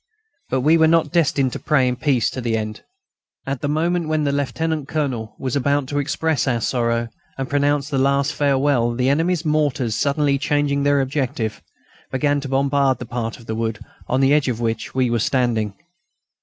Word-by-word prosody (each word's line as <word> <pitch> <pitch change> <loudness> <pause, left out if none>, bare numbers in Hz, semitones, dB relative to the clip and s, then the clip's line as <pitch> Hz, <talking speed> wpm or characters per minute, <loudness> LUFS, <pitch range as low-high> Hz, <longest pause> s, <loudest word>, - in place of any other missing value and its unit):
But 130 - 0
we 155 +5 +4
were 160 - +6
not 160 -2 +2
destined 145 -6 +2
to - - -4
pray 140 -4 +2
in 125 - 0
peace 125 -2 +1
to 130 - -5
the 115 -2 0
end. 110 0 -5 0.6
At 135 -1 -3
the - - -1
moment 165 +3 0
when 155 -1 0
the 140 - +1
Lieutenant 150 +1 -2
Colonel 130 -9 -3
was 130 -1 -3
about 140 +1 +1
to 145 - -1
express 155 -1 0
our 120 -3 +1
sorrow 115 -1 0 0.3
and 135 -1 -3
pronounce 145 0 +1
the 140 -2 -1
last 140 +3 +2
farewell 135 -5 +2
the 125 +2 +1
enemy's 165 +3 +1
mortars, 145 -7 0
suddenly 140 0 +1
changing 145 -1 +1
their 145 0 +3
objective, 130 -5 -2 0.5
began 145 +2 +1
to 140 - -6
bombard 135 -1 +2
the 125 - -7
part 115 -1 -4
of 115 - -15
the 110 - -4
wood 110 -1 -2 0.3
on 130 +2 +1
the 135 +1 +4
edge 150 -2 +2
of 120 -3 -1
which 115 0 -3
we 130 -2 +2
were 120 - +1
standing. 115 -4 0
140 Hz, 195 wpm, -21 LUFS, 120-145 Hz, 0.6 s, were